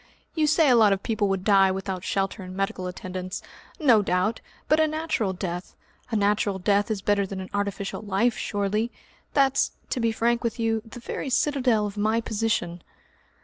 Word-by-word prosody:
You 310 -2 +2
say 315 +1 +4
a 250 - +6
lot 215 -3 +6
of 195 - -4
people 215 -2 0
would 195 -1 -1
die 195 -2 +5
without 190 -1 -3
shelter 195 +2 -1
and 185 0 -8
medical 195 -2 -2
attendance! 185 0 -6 0.4
No 245 -9 +5
doubt 190 +3 0 0.3
but 310 - +4
a 315 - +4
natural 310 -10 -1
death. 180 -1 -5 0.3
A 225 - -2
natural 205 -1 +1
death 200 +3 +1
is 205 -3 -2
better 205 -1 +2
than 190 0 -6
an 185 - -7
artificial 200 0 -2
life, 215 +3 +1
surely? 205 +3 -1 0.5
That's 275 -2 +3 0.2
to 255 - 0
be 230 -1 +2
frank 235 +2 +1
with 235 0 -2
you 225 -1 +1
the 225 +2 -11
very 255 +3 -5
citadel 255 -5 +2
of 205 0 -6
my 215 +2 +2
position." 215 -6 -1
205 Hz, 185 wpm, -25 LUFS, 195-230 Hz, 0.5 s, a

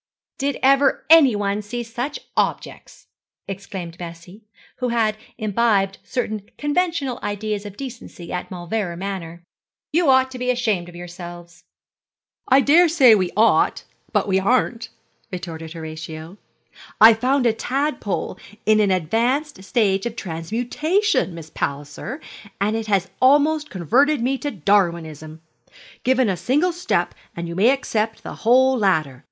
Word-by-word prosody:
'Did 280 0 -1
ever 275 +1 +3
anyone 210 -10 +5
see 240 +4 -5
such 245 +5 -5
objects?' - - -3 0.4
exclaimed 190 -3 -7
Bessie, 175 +4 -10 0.4
who 250 - -1
had 225 -2 +1 0.2
imbibed 205 -3 +1
certain 215 -5 -4
conventional 295 -4 -1
ideas 205 0 -3
of 205 - -11
decency 240 -10 -8
at 180 - -4
Mauleverer 180 0 -3
Manor: 175 -3 -6 0.5
'you 335 -2 +3
ought 260 0 +4
to 255 - -8
be 250 0 -2
ashamed 215 -8 0
of 175 - -13
yourselves.' 175 0 -10 0.8
'I 265 +1 +5
daresay 310 -4 +6
we 185 -4 +2
ought, 225 +2 +3 0.3
but - - +1
we 190 -1 +2
aren't,' 235 +2 0 0.4
retorted 165 -3 -6
Horatio. 160 +2 -8 0.6
'I 225 +2 +9
found 255 +4 +1
a 230 - +4
tadpole 235 - -2 0.3
in 215 0 +4
an 205 -2 +3
advanced 225 - 0
stage 200 -2 +1
of 235 - -7
transmutation, 235 - -1
Miss 160 -2 -10
Palliser, 145 - -4 0.4
and 210 +3 +1
it 225 -1 -3
has 195 -2 +1
almost 295 +3 +4
converted 255 - +2
me 260 +3 0
to 290 - -2
Darwinism. 165 - -1 0.6
Given 260 -1 +2
a 190 -3 0
single 300 - +1
step 355 +2 -1 0.2
and 170 0 -5
you 170 - -6
may 205 +6 +4
accept 225 -5 -1
the - - -7
whole 260 +3 +4
ladder. 160 - +1
215 Hz, 135 wpm, -21 LUFS, 175-260 Hz, 0.8 s, I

